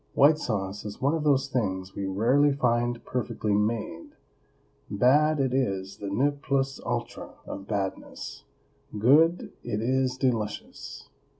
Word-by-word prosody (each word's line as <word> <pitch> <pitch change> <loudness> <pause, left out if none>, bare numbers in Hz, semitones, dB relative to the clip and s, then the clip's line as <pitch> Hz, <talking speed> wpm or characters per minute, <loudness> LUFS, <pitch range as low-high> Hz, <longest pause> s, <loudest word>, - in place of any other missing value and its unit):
WHITE 150 +2 +6
SAUCE 100 -4 -3
is 105 -1 -7
one 140 +3 +2
of 160 -2 -1
those 140 -2 +3
things 95 -7 -2
we 100 - -3
rarely 125 +9 +3
find 120 -3 0
perfectly 110 -4 -2
made; 105 -5 -2 0.7
bad, 145 +8 +3
it 130 -2 +1
is 100 -7 -1
the 100 - -5
ne 130 +9 +2
plus 135 -1 -1
ultra - - -4
of 95 0 -7
badness; 100 -3 -4 0.5
good, 155 +10 +4
it 105 - -2
is 130 +2 0
delicious. 115 -6 -3
120 Hz, 130 wpm, -27 LUFS, 105-135 Hz, 0.7 s, WHITE